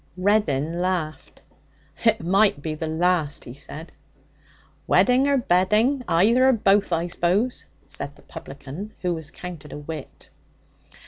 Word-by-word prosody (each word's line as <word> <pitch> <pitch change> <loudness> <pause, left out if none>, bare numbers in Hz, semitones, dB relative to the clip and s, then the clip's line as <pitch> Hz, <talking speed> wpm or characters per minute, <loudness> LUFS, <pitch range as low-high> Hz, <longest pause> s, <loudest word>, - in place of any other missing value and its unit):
Reddin 175 -5 +1
laughed. 180 -4 -3 0.6
'It 225 -2 +3
might 195 -2 +3
be 155 - -2
the 160 +1 -4
last,' 160 -2 0
he 120 - -8
said. 150 +4 -10 1.0
'Wedding 255 +2 +4
or 280 -1 +3
bedding, 220 +6 +2
either 230 +10 +4
or - - +5
both, 205 -3 +2
I 170 0 +1
suppose,' 180 +8 0 0.2
said 145 - -7
the - - -20
publican, 145 +10 -9
who 180 -1 +1
was 160 -3 -5
counted 165 -4 -9
a - - -6
wit. 150 0 -9
180 Hz, 135 wpm, -24 LUFS, 155-210 Hz, 1.0 s, or